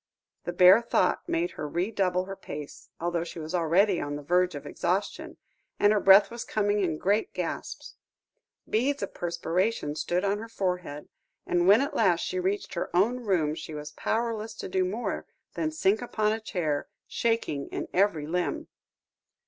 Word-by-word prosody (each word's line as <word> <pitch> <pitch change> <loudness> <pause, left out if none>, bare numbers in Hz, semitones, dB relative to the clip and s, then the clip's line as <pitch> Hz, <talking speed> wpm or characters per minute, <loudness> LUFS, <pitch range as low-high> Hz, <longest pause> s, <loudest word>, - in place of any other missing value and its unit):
The - - -2
bare 185 +5 +7
thought 235 - 0
made 340 +1 0
her 150 - -5
redouble 185 +1 0
her 195 0 -6
pace, 150 -5 -9
although 170 0 -1
she 170 - -9
was 160 +1 -6
already 180 +3 +3
on 145 0 -3
the 145 - -7
verge 180 +2 +2
of 145 - -7
exhaustion, 190 +4 -2 0.4
and 205 +1 +5
her 210 - +3
breath 195 +1 +7
was 235 0 -5
coming 205 -1 0
in 170 -6 0
great 205 +6 0
gasps. - - -5 0.7
Beads 260 +3 0
of 200 - -5
perspiration 170 0 -1
stood 175 +4 -1
on 200 +1 0
her 225 +1 -8
forehead, 180 -8 -3 0.4
and 175 0 +1
when 205 +6 +7
at 285 +2 -2
last 180 -6 +3
she 185 - -2
reached 195 +3 -2
her 170 - -3
own 225 +8 +3
room, 180 -10 +1
she 155 -1 -7
was 150 0 -7
powerless 225 +5 -2
to - - -6
do 185 0 +1
more 205 +6 -3 0.3
than 315 - -1
sink 220 -9 +1
upon 215 -3 0
a 220 - -1
chair, 160 -9 -2 0.2
shaking 225 -12 -1
in - - -5
every 185 -6 +2
limb. 180 - -2
185 Hz, 175 wpm, -27 LUFS, 170-215 Hz, 0.7 s, bare